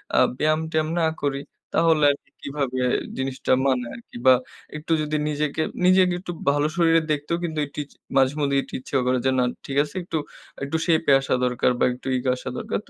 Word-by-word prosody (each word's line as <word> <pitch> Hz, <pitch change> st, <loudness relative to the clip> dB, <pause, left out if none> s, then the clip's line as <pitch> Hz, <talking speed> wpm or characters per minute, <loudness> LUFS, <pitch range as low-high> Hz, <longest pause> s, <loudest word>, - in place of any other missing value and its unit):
আ -, -, +3 dB, 0.2 s
ব্যায়াম-টেয়াম 155 Hz, 0 st, +1 dB
না -, -, +3 dB, 0.2 s
করি, 140 Hz, -1 st, 0 dB, 0.4 s
তাহলে 160 Hz, -2 st, +4 dB
আরকি 140 Hz, -, -8 dB
কিভাবে 135 Hz, -3 st, -3 dB, 0.4 s
জিনিসটা 130 Hz, 0 st, -2 dB
মানায় 125 Hz, -3 st, 0 dB
আরকি।" 235 Hz, -, -12 dB
বা, 130 Hz, -, +9 dB, 0.4 s
একটু 155 Hz, +2 st, -7 dB
যদি 155 Hz, 0 st, -1 dB
নিজেকে 150 Hz, +1 st, -1 dB, 0.2 s
নিজেকে 185 Hz, 0 st, +5 dB
একটু 180 Hz, -1 st, -6 dB, 0.2 s
ভালো 145 Hz, +1 st, +1 dB
শরীরে 165 Hz, -1 st, +4 dB
দেখতেও 150 Hz, +3 st, -1 dB
কিন্তু 160 Hz, -2 st, -2 dB
একটু 140 Hz, -, -19 dB
ইছ 145 Hz, -, -21 dB, 0.2 s
মাঝেমধ্যেই 140 Hz, +1 st, +2 dB
একটু -, -, -16 dB
ইচ্ছে 135 Hz, -, -7 dB
করে 130 Hz, 0 st, +3 dB
যে, 130 Hz, -, +4 dB
না, 125 Hz, -, +4 dB, 0.2 s
ঠিক 140 Hz, -, -4 dB
আছে. 150 Hz, +4 st, -10 dB
একটু 165 Hz, -, -3 dB, 0.5 s
একটু 140 Hz, +4 st, -1 dB
শেপে 160 Hz, -3 st, +3 dB
আসা 135 Hz, -, -2 dB
দরকার 125 Hz, 0 st, +1 dB
বা, -, -, +2 dB
একটু 125 Hz, +2 st, -10 dB
ইগ 125 Hz, -, -5 dB
আসা 125 Hz, -, -6 dB
দরকার। -, -, -2 dB
তো -, -, -22 dB
145 Hz, 190 wpm, -24 LUFS, 135-160 Hz, 0.5 s, বা